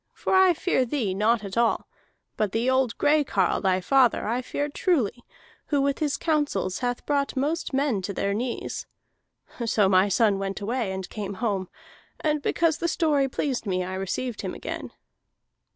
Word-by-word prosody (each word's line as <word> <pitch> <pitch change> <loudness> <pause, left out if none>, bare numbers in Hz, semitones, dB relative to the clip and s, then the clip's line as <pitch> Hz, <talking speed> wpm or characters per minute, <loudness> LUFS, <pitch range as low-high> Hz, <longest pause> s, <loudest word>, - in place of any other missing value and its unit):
For - - -2
I 375 -2 +6
fear 325 -5 +1
thee 235 -6 -1
not 215 +3 +2
at 195 -1 -6
all, 235 -1 +2 0.5
but 210 -3 -1
the 230 +2 0
old 260 -3 +1
gray 295 +1 +3
carle, 195 -9 +1
thy 185 -2 +2
father, 250 +3 +3
I 240 +3 0
fear 285 +3 -2
truly, 270 - 0 0.4
who 290 - +1
with 275 0 +1
his 300 -3 0
counsels 290 - 0
hath 245 -1 -2
brought 285 -1 0
most 300 +5 -1
men 270 -7 +1
to 185 - -4
their 200 0 -1
knees.' 240 +3 -3 0.8
So 215 -3 +3
my 190 +1 +4
son 200 0 +3
went 195 +1 -3
away, 225 0 -2
and 190 -1 -4
came 200 -2 -5
home, 195 -3 -2 0.5
and 300 -1 0
because 330 +1 +1
the 340 - 0
story 300 -5 +2
pleased 255 -4 -2
me 185 -1 0
I 185 +1 -5
received 200 +5 -3
him - - -4
again." - - -6
240 Hz, 175 wpm, -26 LUFS, 200-285 Hz, 0.8 s, I